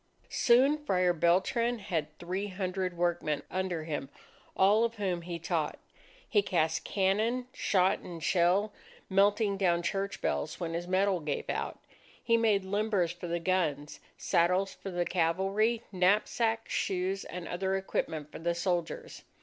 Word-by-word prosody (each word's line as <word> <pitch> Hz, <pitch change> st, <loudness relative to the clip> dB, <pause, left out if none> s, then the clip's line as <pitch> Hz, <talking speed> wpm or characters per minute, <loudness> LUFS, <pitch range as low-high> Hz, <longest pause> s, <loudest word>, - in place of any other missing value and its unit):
Soon 270 Hz, +5 st, +4 dB
Friar 180 Hz, -8 st, +2 dB
Beltran 190 Hz, +9 st, +2 dB
had 160 Hz, -7 st, -3 dB
three 185 Hz, +4 st, -3 dB
hundred 185 Hz, -2 st, -3 dB
workmen 170 Hz, -4 st, 0 dB
under 185 Hz, -3 st, -2 dB
him, 145 Hz, -4 st, -4 dB, 0.5 s
all 205 Hz, +4 st, +5 dB
of 230 Hz, 0 st, 0 dB
whom 190 Hz, -5 st, -1 dB
he 170 Hz, 0 st, -5 dB
taught. 165 Hz, -2 st, -2 dB, 0.5 s
He 210 Hz, -, +3 dB
cast 165 Hz, -4 st, 0 dB
cannon, 215 Hz, +6 st, +1 dB
shot, 185 Hz, -1 st, +2 dB
and 170 Hz, -3 st, -9 dB
shell, 190 Hz, +4 st, +2 dB, 0.4 s
melting 200 Hz, +1 st, +3 dB
down 175 Hz, -3 st, +2 dB
church 195 Hz, +2 st, -2 dB
bells 155 Hz, -, -2 dB
when 165 Hz, -2 st, -3 dB
his 175 Hz, +1 st, -3 dB
metal 190 Hz, 0 st, +2 dB
gave 150 Hz, -3 st, -3 dB
out. -, -, -3 dB, 0.5 s
He 230 Hz, -, +3 dB
made 215 Hz, -4 st, +2 dB
limbers 200 Hz, -3 st, 0 dB
for 175 Hz, 0 st, -7 dB
the 170 Hz, 0 st, -1 dB
guns, 160 Hz, -5 st, -1 dB, 0.2 s
saddles 180 Hz, +2 st, +2 dB
for 195 Hz, -, -8 dB
the 175 Hz, -1 st, -1 dB
cavalry, 195 Hz, +7 st, +1 dB
knapsacks, 215 Hz, +4 st, +1 dB
shoes, 190 Hz, +1 st, -1 dB
and 180 Hz, -1 st, -7 dB
other 190 Hz, +2 st, -1 dB
equipment 160 Hz, -5 st, -3 dB
for -, -, -8 dB
the 170 Hz, +1 st, -1 dB
soldiers. 175 Hz, -1 st, -2 dB
185 Hz, 145 wpm, -30 LUFS, 170-200 Hz, 0.5 s, all